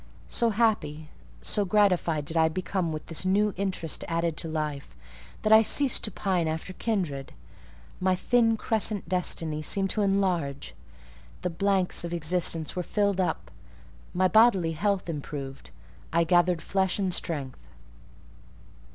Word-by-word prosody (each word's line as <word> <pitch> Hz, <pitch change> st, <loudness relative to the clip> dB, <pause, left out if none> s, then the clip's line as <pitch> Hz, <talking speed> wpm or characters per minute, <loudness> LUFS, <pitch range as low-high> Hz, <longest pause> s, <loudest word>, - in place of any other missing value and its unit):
So 235 Hz, -, +1 dB
happy, 175 Hz, -9 st, 0 dB, 0.3 s
so 205 Hz, -, +1 dB
gratified 180 Hz, -6 st, +2 dB
did 160 Hz, -, -3 dB
I 160 Hz, -1 st, +4 dB
become 185 Hz, 0 st, -2 dB
with 155 Hz, -1 st, -5 dB
this 165 Hz, -, -2 dB
new 200 Hz, +2 st, +2 dB
interest 185 Hz, -4 st, -2 dB
added 165 Hz, -1 st, -1 dB
to -, -, -2 dB
life, 150 Hz, -3 st, -4 dB, 0.5 s
that 215 Hz, -, +4 dB
I 220 Hz, -, +9 dB
ceased 270 Hz, +4 st, +2 dB
to 215 Hz, -, -4 dB
pine 180 Hz, -3 st, -1 dB
after 160 Hz, +3 st, -4 dB
kindred: 175 Hz, -12 st, -3 dB, 0.7 s
my 185 Hz, 0 st, +2 dB
thin 225 Hz, +3 st, +2 dB
crescent 215 Hz, -3 st, -1 dB
destiny 165 Hz, -3 st, -1 dB
seemed 195 Hz, +5 st, +1 dB
to 215 Hz, -, 0 dB
enlarge; 185 Hz, -8 st, 0 dB, 0.7 s
the 180 Hz, -, -1 dB
blanks 195 Hz, 0 st, +1 dB
of 170 Hz, 0 st, -3 dB
existence 165 Hz, 0 st, 0 dB
were 180 Hz, -, -1 dB
filled 200 Hz, +1 st, 0 dB
up; 180 Hz, -, -3 dB, 0.6 s
my 185 Hz, +1 st, +2 dB
bodily 195 Hz, -5 st, +4 dB
health 195 Hz, +4 st, -1 dB
improved; 140 Hz, -3 st, -6 dB, 0.4 s
I 170 Hz, +1 st, +3 dB
gathered 175 Hz, 0 st, +2 dB
flesh 190 Hz, -2 st, 0 dB
and 190 Hz, -3 st, 0 dB
strength. 140 Hz, -8 st, -2 dB
180 Hz, 140 wpm, -27 LUFS, 160-200 Hz, 0.7 s, I